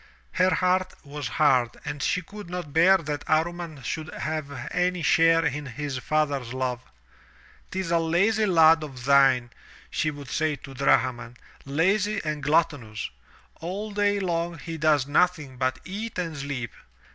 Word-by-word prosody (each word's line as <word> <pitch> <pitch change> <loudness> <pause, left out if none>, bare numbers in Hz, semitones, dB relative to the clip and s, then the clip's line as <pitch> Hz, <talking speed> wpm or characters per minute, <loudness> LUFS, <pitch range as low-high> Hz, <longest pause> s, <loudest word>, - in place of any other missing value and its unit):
Her 185 0 +3
heart 185 0 +1
was 145 -2 -5
hard 130 -3 +2
and 145 - -4
she 180 - 0
could 205 0 -10
not 180 -5 -6
bear 185 +4 +6
that 150 -4 -4
Amman 160 -2 -1
should 155 +6 -4
have 155 -1 -4 0.2
any 180 -1 0
share 165 +2 +4
in 150 -1 -2
his 135 +1 -4
father's 140 -3 -1
love. 125 -1 -2 0.5
" - - -28
'Tis 190 -3 -3
a 170 - +4
lazy 200 +7 +2
lad 165 -3 +6
of 130 -5 -8
thine," 135 -3 +4 0.4
she 155 - 0
would 145 -3 -8
say 155 -1 0
to 135 0 -12
Drahman, 125 -2 +1 0.3
"lazy 195 +9 +1
and 155 -1 -2
gluttonous. 145 -8 0 0.5
All 195 +6 -5
day 205 0 +1
long 170 -2 -2
he 165 +1 -7
does 150 -3 +2
nothing 150 -3 +1
but 130 0 0
eat 210 +4 -5
and 165 -3 -3
sleep. 140 -4 -4
155 Hz, 155 wpm, -26 LUFS, 140-180 Hz, 0.5 s, bear